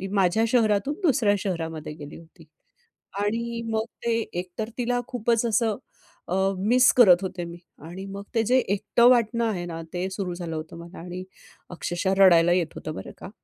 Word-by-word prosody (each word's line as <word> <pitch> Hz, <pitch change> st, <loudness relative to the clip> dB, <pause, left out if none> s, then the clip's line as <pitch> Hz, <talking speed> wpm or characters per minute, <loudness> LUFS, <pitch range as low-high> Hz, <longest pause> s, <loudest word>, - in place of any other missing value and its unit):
माझ्या 195 Hz, +3 st, +3 dB
शहरातून 225 Hz, +3 st, +2 dB
दुसऱ्या 245 Hz, -10 st, +3 dB
शहरामध्ये 160 Hz, -5 st, -4 dB
गेली 145 Hz, -1 st, -10 dB
होती. 165 Hz, 0 st, -17 dB, 0.7 s
आणि 230 Hz, +3 st, -2 dB
मग 220 Hz, 0 st, 0 dB, 0.2 s
ते 235 Hz, -, +1 dB, 0.3 s
एक 180 Hz, 0 st, -6 dB
तर 220 Hz, -, -2 dB
तिला 245 Hz, 0 st, 0 dB
खूपच 235 Hz, -2 st, 0 dB
असं 225 Hz, -2 st, +1 dB, 0.5 s
अ, 180 Hz, -, -1 dB, 0.2 s
मिस 245 Hz, +6 st, +4 dB
करत 190 Hz, -7 st, +7 dB
होते 180 Hz, -1 st, -4 dB
मी. 170 Hz, 0 st, -9 dB, 0.3 s
आणि 180 Hz, +4 st, -8 dB
मग 195 Hz, 0 st, -7 dB
ते 225 Hz, -, +3 dB
जे 250 Hz, +4 st, +3 dB
एकटं 220 Hz, +3 st, +2 dB
वाटणं 235 Hz, -1 st, +3 dB
आहे 185 Hz, -6 st, -2 dB
ना, 165 Hz, -1 st, -6 dB
ते 180 Hz, +2 st, -2 dB
सुरू 190 Hz, -2 st, -4 dB
झालं 175 Hz, -2 st, -5 dB
होतं 155 Hz, +1 st, -7 dB
मला 170 Hz, +2 st, -11 dB
आणि 180 Hz, +2 st, -7 dB, 0.5 s
अक्षरशः 175 Hz, +2 st, -1 dB
रडायला 175 Hz, -3 st, +6 dB
येत 175 Hz, -3 st, +1 dB
होतं 155 Hz, -, -6 dB
बरं -, -, -8 dB
का. -, -, -9 dB
195 Hz, 175 wpm, -25 LUFS, 175-230 Hz, 0.7 s, करत